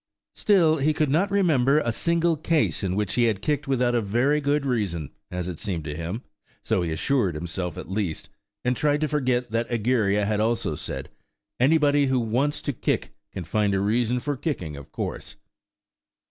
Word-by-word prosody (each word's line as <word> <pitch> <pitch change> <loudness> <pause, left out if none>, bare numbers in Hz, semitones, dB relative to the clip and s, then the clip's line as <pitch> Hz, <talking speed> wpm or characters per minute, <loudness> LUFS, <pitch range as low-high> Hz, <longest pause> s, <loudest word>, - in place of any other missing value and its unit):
Still, 170 -7 +3
he 150 +3 +2
could 150 -3 +1
not 180 +7 +2
remember 155 -9 +3
a 120 -6 +1
single 170 +6 +2
case 155 0 +1
in 95 -1 0
which 105 -1 -1
he 120 - +3
had 110 -4 +1
kicked 145 -1 0
without 125 -2 +2
a 120 - +2
very 120 +9 +1
good 145 0 +1
reason–as 90 - -3
it 90 -4 -5
seemed 95 -7 -3
to 75 -1 -5
him–so 105 - -4
he 85 -2 -2
assured 95 - +1
himself 85 +2 -4
at - - -7
least, 95 -4 -3 0.4
and 125 +1 +2
tried 145 +2 +1
to 155 - +2
forget 125 -5 0
that 115 +1 -1
Egeria 110 -3 +1
had 105 0 0
also 110 -5 0
said, - - -6 0.5
"Anybody 145 +1 +4
who 130 -1 +2
wants 125 +6 0
to 145 - -1
kick - - -2 0.2
can 95 - -5
find 100 +3 +1
a - - +1
reason 115 +4 +1
for 145 +3 -2
kicking, 125 - -3
of 70 -1 -11
course!" - - -5
120 Hz, 180 wpm, -25 LUFS, 100-145 Hz, 0.5 s, Anybody